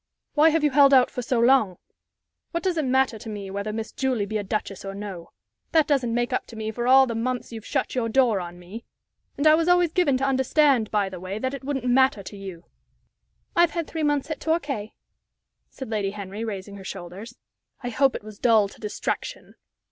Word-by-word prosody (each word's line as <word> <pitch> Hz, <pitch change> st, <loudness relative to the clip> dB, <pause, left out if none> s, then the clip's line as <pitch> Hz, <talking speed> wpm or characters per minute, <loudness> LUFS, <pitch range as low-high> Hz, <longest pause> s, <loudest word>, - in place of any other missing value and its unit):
"Why 310 Hz, +2 st, +6 dB
have 320 Hz, -1 st, +1 dB
you 295 Hz, -, +3 dB
held 280 Hz, 0 st, +6 dB
out 255 Hz, -1 st, +5 dB
so 250 Hz, 0 st, -1 dB
long? 235 Hz, -7 st, +4 dB, 0.8 s
What 335 Hz, -, -2 dB
does 370 Hz, -2 st, 0 dB
it 310 Hz, -3 st, 0 dB
matter 260 Hz, -3 st, +1 dB
to 225 Hz, -, -8 dB
me 200 Hz, -2 st, -6 dB
whether 200 Hz, +2 st, -3 dB
Miss 220 Hz, +1 st, -5 dB
Julie 255 Hz, -6 st, -1 dB
be 215 Hz, +1 st, -2 dB
a -, -, -3 dB
duchess 200 Hz, -1 st, -4 dB
or 195 Hz, 0 st, -6 dB
no? 195 Hz, -4 st, -7 dB, 0.4 s
That 320 Hz, -2 st, +5 dB
doesn't 255 Hz, -5 st, +1 dB
make 240 Hz, +2 st, 0 dB
up -, -, -1 dB
to 230 Hz, -, -11 dB
me 220 Hz, 0 st, -4 dB
for 240 Hz, +2 st, -3 dB
all 265 Hz, +1 st, +7 dB
the 235 Hz, -, -4 dB
months 245 Hz, +2 st, -3 dB
you've 225 Hz, -2 st, -8 dB
shut 270 Hz, -, -1 dB
your 240 Hz, -3 st, -1 dB
door 235 Hz, -4 st, +3 dB
on 175 Hz, 0 st, -8 dB
me. 185 Hz, +6 st, -10 dB, 0.5 s
And 285 Hz, -, -1 dB
I 310 Hz, -, +8 dB
was 330 Hz, +1 st, +2 dB
always 355 Hz, -2 st, +4 dB
given 320 Hz, -7 st, +2 dB
to 270 Hz, -, -1 dB
understand, 265 Hz, -3 st, +3 dB
by 205 Hz, -2 st, +1 dB
the 185 Hz, -2 st, -7 dB
way, 185 Hz, +3 st, -5 dB
that 260 Hz, +4 st, -2 dB
it 275 Hz, -, -7 dB
wouldn't 270 Hz, -2 st, -3 dB
matter 250 Hz, -4 st, +3 dB
to 205 Hz, -, -9 dB
you." 190 Hz, -4 st, -9 dB, 0.9 s
"I've 345 Hz, -1 st, +5 dB
had 335 Hz, -, 0 dB
three 320 Hz, -, -5 dB
months 290 Hz, 0 st, 0 dB
at 310 Hz, -, -3 dB
Torquay," 290 Hz, -10 st, -2 dB, 0.8 s
said 265 Hz, -4 st, -8 dB
Lady 205 Hz, -3 st, 0 dB
Henry, 200 Hz, +1 st, -6 dB
raising 200 Hz, -2 st, -6 dB
her 195 Hz, -, -10 dB
shoulders. 190 Hz, +7 st, -8 dB, 0.5 s
"I 245 Hz, -, -2 dB
hope 270 Hz, +3 st, +2 dB
it -, -, -6 dB
was 215 Hz, -1 st, -11 dB
dull 220 Hz, -4 st, +4 dB
to -, -, -16 dB
distraction." 210 Hz, -1 st, -4 dB
240 Hz, 215 wpm, -24 LUFS, 205-275 Hz, 0.9 s, I